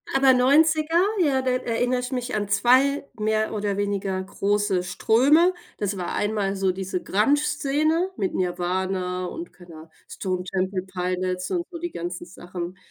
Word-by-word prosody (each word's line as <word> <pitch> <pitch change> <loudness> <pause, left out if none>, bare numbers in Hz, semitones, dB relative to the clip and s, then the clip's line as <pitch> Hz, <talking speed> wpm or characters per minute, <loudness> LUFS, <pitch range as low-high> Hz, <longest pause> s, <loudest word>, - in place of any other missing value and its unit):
Aber 270 -1 +6
90er, 310 +5 +4 0.2
ja, 275 -6 +2
da 255 - +1
erinnere 250 0 0
ich 250 +1 -5
mich 250 -2 -3
an 205 -1 -1
2 260 +7 +3
mehr 215 +1 0
oder 205 -1 -2
weniger 200 -2 -1
große 200 -1 0
Ströme. 280 - +4 0.2
Das 200 -1 -2
war 180 - -3
einmal 205 -2 0
so 190 -1 +1
diese 185 -1 -4
Grunge-Szene 290 - +1
mit 195 -3 -1
Nirvana 180 0 -1
und 335 - -7
keine 175 -3 -14
Ah 160 +1 -12 0.2
Stone 185 -2 -3
Temple 185 0 -1
Pilots 185 0 -3
und 350 -2 0
so, 345 - -7
die 345 0 -5
ganzen 175 +1 -5
Sachen. 175 0 -7
205 Hz, 155 wpm, -24 LUFS, 185-265 Hz, 0.2 s, Aber